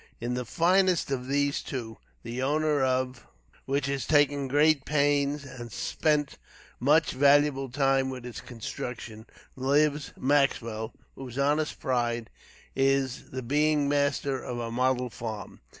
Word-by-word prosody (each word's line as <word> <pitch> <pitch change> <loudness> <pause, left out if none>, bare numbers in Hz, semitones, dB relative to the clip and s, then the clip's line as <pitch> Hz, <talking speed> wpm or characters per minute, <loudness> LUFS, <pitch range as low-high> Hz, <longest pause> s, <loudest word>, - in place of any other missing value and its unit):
In 120 +1 -2
the 125 0 -3
finest 180 - +2
of 130 -2 -2
these 145 +1 +1
two, 115 -5 -6 0.2
the 120 +2 -4
owner 150 +1 +1
of 130 -1 -1 0.4
which 135 0 0
has 140 -3 -2
taken 145 -2 +3
great 145 +1 +3
pains 145 0 +1
and 120 -3 -9
spent 150 +5 0 0.4
much 150 +5 +3
valuable 140 0 +3
time 135 0 +2
with 130 -2 -7
its 125 0 -7
construction, 120 -2 -7 0.3
lives 145 +2 +1
Maxwell, 120 -5 +1 0.2
whose 130 -2 -9
honest 150 +2 +1
pride 120 -3 -1 0.4
is 135 -1 +1
the 130 0 -5
being 150 +3 +2
master 140 -1 0
of 125 - -5
a 115 -1 -4
model 125 0 0
farm. 110 -4 -7
135 Hz, 135 wpm, -28 LUFS, 125-145 Hz, 0.4 s, taken